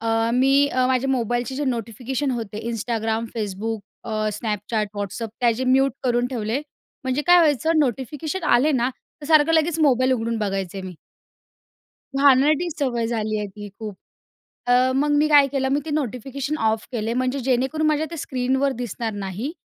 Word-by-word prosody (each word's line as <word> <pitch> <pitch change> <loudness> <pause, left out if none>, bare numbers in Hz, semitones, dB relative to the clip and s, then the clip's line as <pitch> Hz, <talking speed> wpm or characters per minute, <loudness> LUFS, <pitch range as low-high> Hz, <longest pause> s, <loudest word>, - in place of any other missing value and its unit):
अ, 225 0 +1
मी 270 +3 +4
अ, 255 -1 +1
माझ्या 260 +1 +1
मोबाईलचे 240 0 -1
जे 290 - -1
नोटिफिकेशन 250 +2 -2
होते 225 -4 -4
Instagram, 225 0 -2
Facebook, 215 +1 -3 0.2
अ, 235 - -6 0.3
Snapchat, 210 0 -2
WhatsApp 205 +3 -4
त्याचे 240 +1 +2
म्यूट 270 +2 +3
करून 245 -1 +2
ठेवले. 240 0 -2 0.4
म्हणजे 260 +3 0
काय 355 0 +7
व्हायचं 320 0 +3
नोटिफिकेशन 295 - -2
आले 275 +5 +4
ना, 250 -2 +1 0.3
तर 290 - -8
सारखं 310 0 +5
लगेच 325 0 +2
मोबाईल 260 -3 +4
उघडून 230 -2 -1
बघायचे 195 -2 -3
मी. 185 -1 -7 1.2
घाणेरडी 285 +4 +4
सवय 240 -5 0
झाली 220 -2 -1
आहे 210 - -2
ती 205 +1 -9
खूप. 215 -2 -6 0.7
अ, 250 +1 +4
मग 290 +2 +2
मी 300 +1 +3
काय 290 -2 +6
केलं, 270 -1 0
मी 280 - +2
ते - - -5
नोटिफिकेशन 275 +1 -3
ऑफ 220 0 +1
केले. 230 -1 -2
म्हणजे 255 +2 -1
जेणेकरून 265 +5 0
माझ्या 305 0 +1
ते 335 - -5
स्क्रीनवर 265 0 0
दिसणार 230 0 -3
नाही 205 - -4
250 Hz, 160 wpm, -23 LUFS, 225-280 Hz, 1.2 s, काय